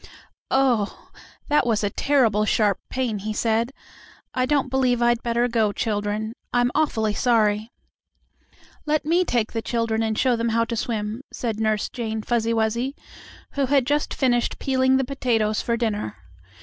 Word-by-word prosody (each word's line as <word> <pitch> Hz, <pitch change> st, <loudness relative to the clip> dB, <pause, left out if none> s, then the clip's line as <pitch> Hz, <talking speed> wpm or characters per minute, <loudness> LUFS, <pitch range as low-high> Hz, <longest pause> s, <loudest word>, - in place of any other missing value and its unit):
"Oh, 250 Hz, -6 st, +1 dB, 0.4 s
that 295 Hz, -1 st, +3 dB
was 220 Hz, -2 st, +1 dB
a 200 Hz, -, 0 dB
terrible 235 Hz, -7 st, +2 dB
sharp 210 Hz, -2 st, +2 dB
pain," 245 Hz, -5 st, -2 dB
he 215 Hz, +2 st, -4 dB
said. 230 Hz, +3 st, 0 dB, 0.6 s
"I 255 Hz, 0 st, 0 dB
don't 280 Hz, -2 st, +1 dB
believe 255 Hz, -2 st, +2 dB
I'd 240 Hz, 0 st, +2 dB
better 235 Hz, +1 st, +1 dB
go, 225 Hz, -3 st, +1 dB
children. 210 Hz, +1 st, -2 dB, 0.2 s
I'm 245 Hz, 0 st, +2 dB
awfully 220 Hz, -9 st, +1 dB
sorry 215 Hz, -2 st, +2 dB, 0.6 s
" -, -, -30 dB
"Let 305 Hz, 0 st, +1 dB
me 340 Hz, +4 st, +3 dB
take 240 Hz, -10 st, 0 dB
the 225 Hz, -, -2 dB
children 230 Hz, -1 st, -1 dB
and 220 Hz, -1 st, -1 dB
show 255 Hz, -2 st, +3 dB
them 230 Hz, 0 st, -1 dB
how 230 Hz, +1 st, +2 dB
to 230 Hz, -, -3 dB
swim," 220 Hz, 0 st, -3 dB
said 225 Hz, -3 st, -3 dB
Nurse 215 Hz, -1 st, +1 dB
Jane 220 Hz, -3 st, -4 dB
Fuzzy 230 Hz, -1 st, 0 dB
Wuzzy, 230 Hz, +4 st, 0 dB, 0.6 s
who 280 Hz, -2 st, 0 dB
had 275 Hz, -1 st, +3 dB
just 295 Hz, +2 st, 0 dB
finished 245 Hz, -3 st, +1 dB
peeling 260 Hz, 0 st, +2 dB
the 265 Hz, -, 0 dB
potatoes 230 Hz, -5 st, 0 dB
for 235 Hz, -1 st, -1 dB
dinner. 210 Hz, -, -2 dB
235 Hz, 160 wpm, -23 LUFS, 220-255 Hz, 0.6 s, that